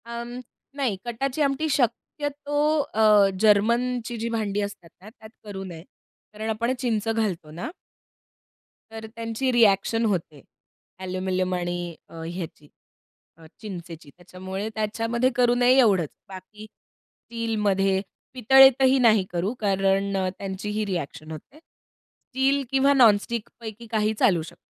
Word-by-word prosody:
अ, 235 0 -5 0.5
नाही 255 -8 -1
कटाची 255 +5 -3
आमटी 280 +2 +1
शक्यतो 290 +3 -2 0.4
अ, 210 -2 +5
जर्मनचीजी 235 +2 +1
भांडी 210 -3 -1
असतात 200 -4 -6
ना 205 - -12
त्यात 220 -1 -15
करू 200 -2 -7
नये. 170 -4 -9 0.5
कारण 215 +1 -5
आपण 230 +3 0
चिंच 225 -4 -1
घालतो 205 -9 -2
ना. 175 - -6 1.2
तर 220 0 -8
त्यांची 230 +3 -2
रिएक्शन 225 0 +3
होते 165 -8 -2 0.6
एल्युमिनियम 185 0 -2
आणि 175 -1 -4
अ, 165 - -10
ह्याची 165 -3 -7 0.7
अ, 165 - -16 0.2
चिंचेची. 170 -7 -9
त्याच्यामुळे 190 +3 -6
त्याच्यामध्ये 225 +3 0
करू 245 -1 +3
नये 245 +1 +4
एवढंच. 195 - +3 0.2
बाकी 195 +3 -11
स्टीलमध्ये 205 -5 -2 0.3
पितळेतही 265 +1 +6
नाही 220 -5 +5
करू 180 +5 -1
कारण 195 -1 +1 0.2
त्यांची 195 +1 -5
ही 210 +1 -2
रिएक्शन 160 -4 -5
होते. 160 - -11
स्टील 275 -3 -4
किंवा 270 +1 +4
नॉन 235 -7 +6
स्टिक 235 -1 -5
पैकी 225 +1 -8
काही 215 -1 +1
चालू 175 -5 +3
शक - - -18
215 Hz, 125 wpm, -24 LUFS, 190-240 Hz, 1.2 s, पितळेतही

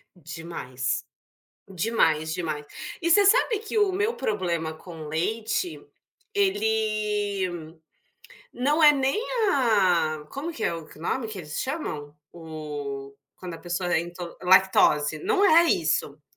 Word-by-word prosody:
Demais, 155 -6 -4 0.6
demais, 165 -5 +1
demais. 155 -4 -3 0.4
E 335 - 0
você 400 +4 +6
sabe 445 +1 +4
que 440 0 -4
o 415 -2 +3
meu 425 +5 0
problema 175 -9 -2
com 160 -1 -10
leite, 220 - -2 0.5
ele 210 - 0 0.8
não 295 +6 +1
é 295 -1 +9
nem 270 +7 0 0.3
a 185 - +2
como 305 +5 -5
que 230 - -8
é - - +1
o 165 -2 -8
que - - -15
o - - -12
nome 225 +5 -2
que 215 - -6
eles 150 -3 -6
chamam? 155 - -4 0.2
O 145 -4 -7 0.2
quando 180 -2 -7
a - - -9
pessoa 175 0 -3
é - - +3
into 175 0 -8
lactose, 180 -5 +4
não 405 - +3
é 335 -3 +7
isso. 155 - 0
180 Hz, 135 wpm, -25 LUFS, 160-260 Hz, 0.8 s, é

